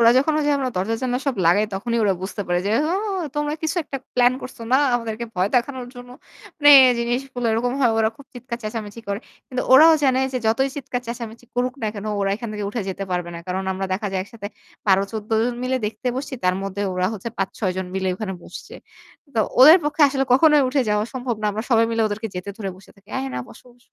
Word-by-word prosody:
ওরা 230 0 +7
যখন 305 +4 +2
যে - - +3 0.3
দরজা 205 +5 0
জানলা 250 -1 0
সব 270 - +1
লাগায় 205 +5 +4
তখনই 235 +4 -1
ওরা 195 -2 +3
বুঝতে 200 +2 -4
পারে 175 0 +2
যে, 205 - 0 0.2
"ও! - - +1 0.4
তোমরা 295 0 -1
কিছু 315 +3 -1
একটা 275 - -5 0.2
প্ল্যান 245 0 +4
করছ 255 - -9
না? - - +7 0.2
আমাদেরকে 230 -1 -2
ভয় 185 +2 +1
দেখানোর 250 0 -1
জন্য।" 245 0 -11 0.5
মানে 290 0 +6 0.3
জিনিসগুলো 245 +1 -2
এরকম 245 +2 0
হয়। 240 -3 +4
ওরা 220 0 +3
খুব 280 - -15
চিৎকার 245 -1 -6
চেঁচামেচি 215 0 -6
করে। 200 0 -1 0.3
কিন্তু 255 -1 -2
ওরাও 315 +5 +9
জানে 260 -1 +3
যে 255 - 0
যতই 265 +5 +2
চিৎকার 255 -2 -3
চেঁচামেচি 235 0 -7
করুক 250 +1 0
না 215 - 0
কেনো 205 +1 -5
ওরা 195 0 +1
এখান 230 +1 -6
থেকে 210 -1 -4
উঠে 230 0 -3
যেতে 195 +1 -4
পারবে 175 -1 -2
না। 170 - -6
কারণ 185 +1 -2
আমরা 190 +1 -3
দেখা 205 +3 -2
যায় 190 - 0
একসাথে 205 -1 -8 0.4
১২ 195 -1 +4
১৪ 215 0 -6
জন 245 - -1
মিলে 260 +1 0
দেখতে 225 +4 -7
বসছি। 275 0 -4
তার 180 - +3
মধ্যে 195 +1 -4
ওরা 180 0 +1
হচ্ছে 220 +2 -5
৫ 195 -1 0
৬ 190 -5 0
জন 190 - -3
মিলে 190 0 -1
ওখানে 190 -1 -5
বসছে। - - -10 0.6
তো 225 - +2 0.2
ওদের 310 +7 +10
পক্ষে 295 +1 +1
আসলে 270 -1 0
কখনোই 300 +2 +6
উঠে 265 +1 +1
যাওয়া 210 0 +1
সম্ভব 250 -2 -2
না। - - +1
আমরা 215 +2 -3
সবাই 230 -1 +5
মিলে 230 -1 +1
ওদেরকে 215 +2 -4
যেতে 180 +2 -5
ধরে 205 -4 -4
বসে 190 - -18
থাকি। 200 +1 -25
"আরে 135 - -2
না 125 - -2
বসো, - - -15
বসো।" 245 0 -29
230 Hz, 230 wpm, -22 LUFS, 200-255 Hz, 0.6 s, ওদের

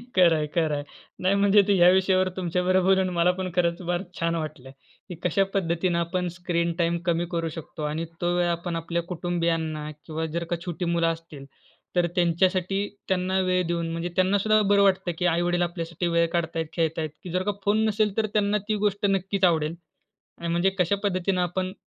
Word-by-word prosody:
खरं 175 -3 +6
आहे, 155 -1 -1
खरं 160 -3 +2
आहे 145 - -3 0.4
नाही 190 +2 +3
म्हणजे 200 +1 +5
ते 205 - +4
ह्या 175 0 +7
विषयावर 185 0 +3
तुमच्याबरोबर 180 +1 +1
बोलून 190 -1 +3
मला 170 +1 +4
पण 185 -1 -2
खरंच 170 0 +1
फार 175 0 0 0.2
छान 170 -1 0
वाटलं, 155 -5 -6 0.4
की 180 - -6
कशा 180 +3 +2
पद्धतीनं 170 -1 0
आपण 180 +2 -1
स्क्रीन 170 -1 -1
टाईम 170 0 +2
कमी 170 -1 +1
करू 165 -1 -1
शकतो 160 -1 -7
आणि 155 +2 -2 0.2
तो 175 0 +1
वेळ 175 - +2
आपण 170 0 -2
आपल्या 170 +1 -2
कुटुंबियांना 165 -3 -2 0.2
किंवा 160 0 -3
जर 170 - -1
का - - +2
छोटी 175 0 -3
मुलं 170 -1 +2
असतील 165 -4 -5 0.5
तर 175 -1 +3
त्यांच्यासाठी, 185 +3 +1 0.2
त्यांना 185 0 +1
वेळ 185 0 +1
देऊन 170 -1 -1
म्हणजे 165 +1 -3
त्यांना 190 +2 +3
सुद्धा 215 +1 +3
बरं 200 0 +5
वाटतं 190 -2 +2
की 180 - -1
आई-वडील 175 +1 +1
आपल्यासाठी 170 0 -2
वेळ 170 0 +2
काढत 170 -1 -1
आहेत, 165 0 -1
खेळत 165 -1 0
आहेत, 155 -1 -2
की 180 - -7
जर 185 +2 0
का 205 - 0
फोन 210 +2 +3
नसेल 210 -1 +1
तर 220 - +2
त्यांना 210 0 +2
ती 215 - +2
गोष्ट 205 0 0
नक्कीच 195 0 -1
आवडेल 160 -2 +1 0.6
आणि 170 - -5
म्हणजे 175 +3 +2
कशा 180 +3 +3
पद्धतीनं 185 -1 0
आपण 185 +1 -2
175 Hz, 200 wpm, -25 LUFS, 165-185 Hz, 0.6 s, ह्या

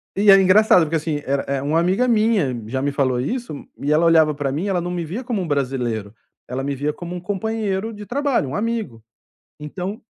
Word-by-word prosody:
Eh 200 - 0
e 205 - +8
é 195 0 +8
engraçado 190 0 +5
porque 160 +1 -2
assim, 150 -2 -2
era 135 0 0
era 140 0 -2
uma 155 +3 +1
amiga 190 +9 +2
minha 215 - +2
já 130 +3 -2
me 140 0 0
falou 130 -3 0
isso. 240 - -3 0.3
E 145 +2 -1
ela 160 +3 +3
olhava 160 -2 +5
para 140 -2 -2
mim, 165 +9 -2
ela 180 -3 0
não 175 - -4
me 175 -2 -3
via 210 +11 -5
como 235 -6 -2
um 175 - -4
brasileiro. 125 -7 -2 0.3
Ela 130 +2 -4
me 140 0 -2
via 145 +3 -1
como 175 0 -7
um - - -4
companheiro 210 +1 -2
de 210 0 -9
trabalho, 270 - 0
um - - -5
amigo. 210 - -3 0.6
Então, 180 +7 -5
170 Hz, 225 wpm, -21 LUFS, 140-205 Hz, 0.6 s, e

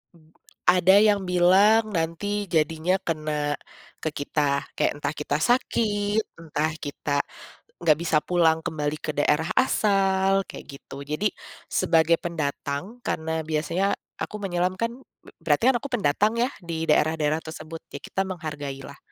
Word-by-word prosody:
Mmm, 160 -1 -23 0.4
ada 185 +1 +6
yang 205 -1 +4
bilang 190 +5 +5
nanti 165 +4 -1 0.3
jadinya 160 +3 +2
kena, 155 -2 -1 0.5
ke 155 - +1
kita. 145 -1 0
Kek - - 0
entah 145 -1 -1
kita 145 -1 -1
sakit, 210 -1 +1 0.2
entah 155 -1 -1
kita, 145 0 -2 0.7
gak 155 -3 +5
bisa 165 -2 +2
pulang 165 -2 +2
kembali 150 -1 -2
ke - - -2
daerah 150 +2 +1
asal, 195 -5 +3
kayak - - -9
gitu. 140 - -10
Jadi, 150 +9 0 0.4
sebagai 165 -2 +3
pendatang, 145 +4 -3
karena 160 0 -1
biasanya 165 +6 0 0.3
aku - - -4
menyelam 180 -1 0
kan 230 +2 -1 0.3
b - - -15
berarti 245 - +3
kan 260 - +3
aku 280 - -6
pendatang 210 0 +2
ya 245 +2 +2
di 165 -2 -3
daerah-daerah 155 0 +2
tersebut. 160 0 -8
Ya - - -4
kita 195 - -2
menghargai 150 -7 -5
lah, - - -11
165 Hz, 140 wpm, -25 LUFS, 150-195 Hz, 0.7 s, ada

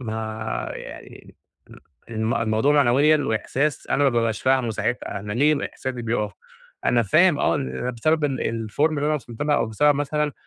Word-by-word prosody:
ما 110 -1 -4
يعني - - -11 0.3
ل - - -15 0.4
ال 110 +2 -1
الموضوع 110 +5 +1
معنويًا 145 +3 +4
وإحساس 135 +6 -1
أنا 145 - +1
ما 140 - +4
بابقاش 115 -2 0
فاهمه 130 -3 +2
ساعتها، 110 -1 -3
أنا 105 +1 -5
ليه 145 +6 +3
إحساسي 130 -2 -5
بيقف 105 -2 -1 0.5
أنا 120 -1 +3
فاهم 155 - +4
آه 85 - +2
إن 65 - -3
بسبب 155 +6 0
ال 115 -5 -2
الform 140 - -9
اللي 150 - -2
أنا 155 - +2
وصَلت 120 -2 -5
لها 150 0 +2
أو - - +1
بسبب 145 +7 +3
مثلًا 150 +1 -1
120 Hz, 170 wpm, -23 LUFS, 110-145 Hz, 0.5 s, معنويًا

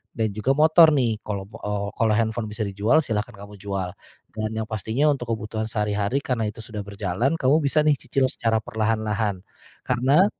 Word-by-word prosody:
dan 110 -2 0
juga 110 +6 0
motor 160 +1 +7
nih, 115 -5 +1
kalau 100 -2 -4
b 105 - -23
eee, 105 -1 -2
kalau 110 -1 +2
handphone 110 0 -1
bisa 110 +1 -3
dijual, 105 +10 +2
silahkan 110 0 -2
kamu 100 +1 -11
jual. 95 -3 -3 0.4
Dan 110 0 -2
yang 110 0 -3
pastinya 110 +8 0
untuk 125 -4 -2
kebutuhan 110 +1 -3
sehari-hari 105 +4 -1
karena 115 -4 -1
itu 105 - -7
sudah 105 -1 -6
berjalan, 100 - -1
kamu 135 +4 +4
bisa 145 +2 +3
nih 150 -2 +3
cicil 135 -2 0
secara 110 -1 0
perlahan-lahan. 110 -3 -1 0.4
Karena, 130 +8 +3
110 Hz, 180 wpm, -24 LUFS, 105-125 Hz, 0.4 s, motor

